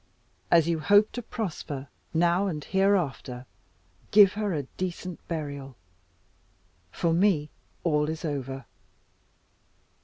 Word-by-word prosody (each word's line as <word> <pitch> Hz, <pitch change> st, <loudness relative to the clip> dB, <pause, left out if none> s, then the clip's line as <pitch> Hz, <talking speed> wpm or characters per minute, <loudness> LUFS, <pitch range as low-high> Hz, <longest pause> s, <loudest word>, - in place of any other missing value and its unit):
As 165 Hz, -2 st, +5 dB
you 165 Hz, -1 st, +1 dB
hope 205 Hz, +5 st, +5 dB
to 245 Hz, -, -5 dB
prosper, 155 Hz, -, -5 dB, 0.2 s
now 175 Hz, +4 st, +2 dB
and 155 Hz, -6 st, -3 dB
hereafter, 175 Hz, -10 st, 0 dB, 0.6 s
give 200 Hz, -2 st, +7 dB
her 210 Hz, -1 st, -1 dB
a 150 Hz, -5 st, -1 dB
decent 180 Hz, +4 st, -5 dB
burial. 140 Hz, -5 st, -5 dB, 1.2 s
For 170 Hz, -2 st, 0 dB
me 170 Hz, -5 st, +2 dB, 0.3 s
all 150 Hz, -3 st, +2 dB
is 160 Hz, +2 st, -4 dB
over." 135 Hz, -3 st, -4 dB
165 Hz, 110 wpm, -27 LUFS, 145-190 Hz, 1.2 s, give